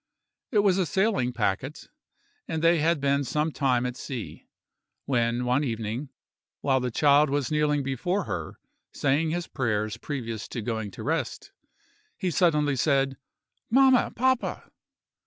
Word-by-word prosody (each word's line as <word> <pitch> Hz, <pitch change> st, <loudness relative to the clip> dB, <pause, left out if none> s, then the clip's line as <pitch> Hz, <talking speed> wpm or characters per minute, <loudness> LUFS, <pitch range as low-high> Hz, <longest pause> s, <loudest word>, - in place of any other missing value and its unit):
It 210 Hz, -4 st, +3 dB
was 195 Hz, -2 st, +3 dB
a 180 Hz, -, +1 dB
sailing 190 Hz, -, +1 dB
packet; 125 Hz, +6 st, -2 dB, 0.6 s
and 160 Hz, 0 st, -3 dB
they 165 Hz, 0 st, +5 dB
had 165 Hz, +1 st, +2 dB
been 140 Hz, 0 st, +1 dB
some 150 Hz, +4 st, -1 dB
time 130 Hz, -4 st, +1 dB
at 125 Hz, 0 st, -3 dB
sea, 125 Hz, -3 st, -7 dB, 0.6 s
when 120 Hz, -1 st, 0 dB
one 125 Hz, +4 st, +2 dB
evening, 115 Hz, +2 st, -3 dB, 0.5 s
while 135 Hz, -2 st, +2 dB
the 125 Hz, 0 st, -2 dB
child 145 Hz, +4 st, +4 dB
was 145 Hz, +1 st, -1 dB
kneeling 150 Hz, -1 st, +1 dB
before 175 Hz, -, -1 dB
her 80 Hz, -, -5 dB, 0.3 s
saying 145 Hz, +3 st, +1 dB
his 175 Hz, +2 st, -2 dB
prayers 110 Hz, -6 st, -1 dB
previous 115 Hz, -6 st, -5 dB
to 120 Hz, -, -5 dB
going 110 Hz, -2 st, -3 dB
to -, -, -9 dB
rest, -, -, -2 dB, 0.7 s
he 185 Hz, -, -1 dB
suddenly 150 Hz, -5 st, +2 dB
said: 135 Hz, 0 st, +2 dB, 0.5 s
"Mamma, 260 Hz, +1 st, +5 dB
papa!" 260 Hz, +1 st, 0 dB
140 Hz, 140 wpm, -26 LUFS, 125-160 Hz, 0.7 s, they